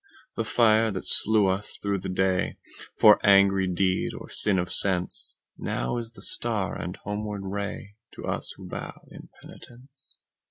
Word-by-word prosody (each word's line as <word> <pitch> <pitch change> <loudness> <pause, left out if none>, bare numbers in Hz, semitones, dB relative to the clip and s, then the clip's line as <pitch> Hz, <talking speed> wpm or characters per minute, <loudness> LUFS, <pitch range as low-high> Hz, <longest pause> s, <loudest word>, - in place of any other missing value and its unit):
The 115 - -2
fire 110 0 +2
that 95 -3 -6
slew 110 -1 +6
us 95 +2 -3
through 100 -1 -3
the 90 - -7
dayFor 95 +3 0
angry 100 -1 +3
deed 90 +1 -2
or - - -11
sin 105 -3 +1
of 90 0 -3
senseNow 90 - +1
is 115 0 -8
the - - -6
star 110 -5 +1
and 90 +1 -7
homeward 105 0 -6
rayTo 100 +3 -8
us - - -4
who - - -12
bow - - -9
in - - -14
penitence. 130 +3 -14
100 Hz, 145 wpm, -24 LUFS, 95-110 Hz, -, slew